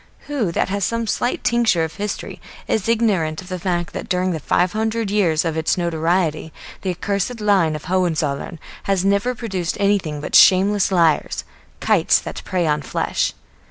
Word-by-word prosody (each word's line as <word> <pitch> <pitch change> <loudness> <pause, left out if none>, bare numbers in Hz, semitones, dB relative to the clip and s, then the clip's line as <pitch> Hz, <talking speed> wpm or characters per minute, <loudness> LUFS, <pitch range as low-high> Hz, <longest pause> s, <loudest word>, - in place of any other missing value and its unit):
Who 275 - -2
that - - 0
has 200 +1 -1
some 230 +4 -1
slight 245 +3 -1
tincture 235 -8 +2
of 160 0 -4
history 205 +2 -5 0.3
is 220 0 0
ignorant 195 -9 +1
of 185 - -10
the 185 -1 -4
fact 175 -1 -2
that - - -6
during 185 0 +1
the 160 - -3
five 175 +4 +1
hundred 220 -1 -1
years 175 -6 +2
of 165 -1 -1
its 160 +2 0
notoriety 165 -1 0 0.3
the 190 - -3
accursed 200 +6 -2
line 195 -7 +2
of 150 - -7
the - - -10
Hohenzollern 165 -4 -1 0.3
has 195 -1 +1
never 200 +6 +1
produced 190 -8 -3
anything 195 -7 +1
but 145 - -7
shameless 195 +1 +5
liars, 170 -4 +2 0.4
kites - - +3
that - - -6
prey 180 -2 -1
on 150 -1 +1
flesh. 135 - -1
185 Hz, 175 wpm, -20 LUFS, 165-205 Hz, 0.4 s, shameless